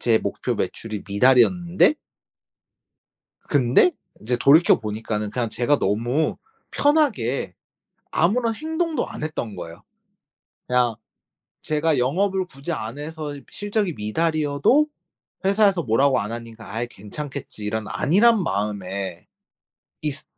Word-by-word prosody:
제 115 -2 +3
목표 - - -3
매출이 110 -3 -4
미달이었는데 130 - +4 1.5
근데 140 - +4 0.3
인제 120 +3 -1
돌이켜 155 +7 +6
보니까는 105 -1 -3
그냥 120 -1 -1
제가 125 +6 +1
너무 120 +10 0 0.3
편하게 200 - +1 0.6
아무런 225 +7 +2
행동도 320 +2 -2
안 - - -8
했던 120 -10 -4
거예요. 85 -1 -9 0.9
그냥 125 -2 +2 0.7
제가 155 0 +1
영업을 190 +9 +1
굳이 140 +2 -6
안 115 -3 -5
해서 150 -1 -5 0.2
실적이 205 -3 -1
미달이어도 155 - +2 0.6
회사에서 195 -2 +3
뭐라고 130 +2 +3
안 105 +2 -4
하니까 115 -2 -8
'아이 115 +3 -2
괜찮겠지.' 125 +1 -7
이런 110 0 -2
안일한 210 +5 +3
마음에 100 - -3 0.8
있으 150 0 -3
135 Hz, 270 characters per minute, -23 LUFS, 110-175 Hz, 1.5 s, 돌이켜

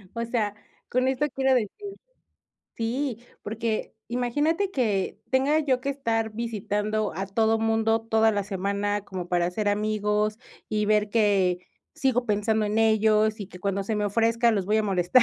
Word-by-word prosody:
O 230 - -2
sea, 220 -4 -1 0.3
con 255 +1 +1
esto 265 +3 +1
quiero 265 0 +3
decir 220 -5 +1 1.1
Sí, 240 +1 -2 0.2
porque, 220 +1 -3
imagínate 290 +11 0
que 215 - -1
tenga 270 +4 +3
yo 265 -4 +1
que 275 - -4
estar 225 -5 -1
visitando 215 -2 -2
a 195 - -1
todo 220 +3 +2
mundo, 225 0 +2
toda 225 0 +3
la 205 -1 -1
semana 200 +1 -1
como 185 -3 -6
para 175 0 +2
ser 210 +3 -3
amigos 210 0 0 0.3
y 210 -1 0
ver 210 0 +3
que 200 -5 +2 0.3
sigo 250 -2 +1
pensando 210 0 +1
en 210 +1 -1
ellos, 220 -1 +3
y 200 - -5
que 180 - -11
cuando 200 +1 -1
se 215 +2 -1
me 210 - 0
ofrezca 230 +3 +2
los 195 -3 -1
voy 210 +2 +2
a - - +2
molestar. 190 +4 +4
220 Hz, 165 wpm, -26 LUFS, 205-235 Hz, 1.1 s, molestar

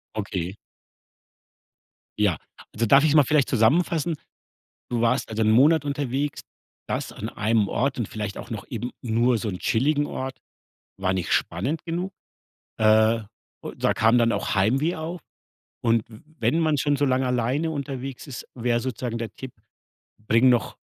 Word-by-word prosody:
Okay. 95 -3 -3 1.6
Ja. 100 -7 +2 0.4
Also, 115 +2 0
darf 135 +6 +6
ich's 155 - +3
mal 150 - +7
vielleicht 145 +1 +2
zusammenfassen? 160 - +2 0.8
Du 120 - 0
warst 120 +3 +1
also 110 0 -1
1 110 - +3
Monat 145 +7 +5
unterwegs. 140 0 -2 0.5
Das - - -3
an - - -6
einem 105 -1 +1
Ort 135 +1 -1
und 115 - -2
vielleicht 105 -2 -5
auch - - -8
noch 110 -4 -5
eben 120 +1 -4
nur 120 +1 +2
so 110 - -3
'n 90 -2 -4
chilligen 145 +5 +1
Ort, 130 0 -5 0.6
war 95 -1 0
nicht 95 -2 -2
spannend 155 +5 -1
genug. 175 +3 -3 0.7
Äh, 110 +1 +4 0.4
u - - -6
da - - +1
kam 115 +2 +4
dann 115 -1 +3
auch - - -1
Heimweh 135 - +2
auf. 165 +2 -5 0.6
Und 115 -1 +3
w 110 - -13 0.2
wenn 165 - +2
man 155 -3 +2
schon 145 +1 +1
so 145 - +1
lange 130 0 +1
alleine 125 +6 0
unterwegs 135 -2 -5
ist, 130 - -7
wäre 120 0 0
sozusagen 120 -1 -3
der 115 -3 -5
Tipp: 130 -2 -8 0.8
„Bring 115 +3 +5
noch 120 -2 +1
125 Hz, 160 wpm, -24 LUFS, 110-145 Hz, 1.6 s, mal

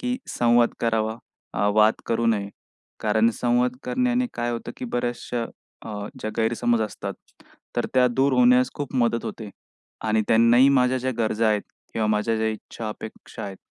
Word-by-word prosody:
की 250 0 -1
संवाद 120 0 +3
करावा 110 -1 0 0.4
अ, 100 - +1
वाद 110 +1 +5
करू 115 0 0
नये. 105 -3 +1 0.5
कारण 110 +1 +3
संवाद 125 +1 +2
करण्याने 250 0 +1
काय 120 0 -1
होतं 120 0 -5
की - - -6
बऱ्याचशा 120 0 -2 0.4
अ, 105 -2 -5
ज्या 110 - -3
गैरसमज 115 +1 +1
असतात 105 - -5 0.6
तर - - +1
त्या 130 -1 +5
दूर 135 +3 +2
होण्यास 125 0 +5
खूप 145 -3 -5
मदत 115 -1 +1
होते. 110 -3 -6 0.5
आणि 110 0 +2
त्यांनाही 115 +4 +6
माझ्या 130 -2 +3
ज्या 130 +1 -1
गरजा 110 0 +1
आहेत 105 -1 +1 0.3
किंवा 110 -1 0
माझ्या 105 +1 +1
ज्या 110 0 0
इच्छा 110 0 -6
अपेक्षा 110 0 -8
आहेत 100 -1 -7
115 Hz, 160 wpm, -24 LUFS, 110-125 Hz, 0.6 s, त्यांनाही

